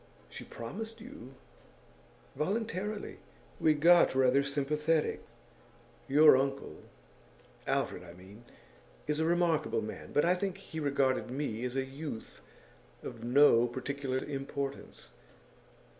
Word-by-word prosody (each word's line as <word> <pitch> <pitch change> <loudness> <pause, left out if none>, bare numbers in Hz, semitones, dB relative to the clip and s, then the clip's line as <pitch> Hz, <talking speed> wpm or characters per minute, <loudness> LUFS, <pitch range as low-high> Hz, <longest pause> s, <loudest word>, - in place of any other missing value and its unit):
'She - - -8
promised 220 - -7
you?' 135 - -11 1.0
'Voluntarily. 210 +3 -3 0.4
We 155 -1 +4
got 170 0 +5
rather 130 +1 +4
sympathetic. 150 +3 0 0.8
Your 150 +1 +7
uncle 135 +1 -2 0.9
Alfred, 90 - -1
I 85 -1 -11
mean 95 +6 -14 0.6
is 150 0 -1
a 160 - +2
remarkable 160 -9 +1
man; 110 - -8
but 145 - +3
I 175 - +4
think 190 +1 -3
he 160 -5 -8
regarded 140 -4 +1
me 125 -4 -3
as 125 0 -4
a 135 0 0
youth 135 -3 -8 0.6
of 115 -2 -8
no 120 -1 +5
particular 130 +2 -3
importance. 140 - -5
140 Hz, 115 wpm, -31 LUFS, 130-160 Hz, 1.0 s, Your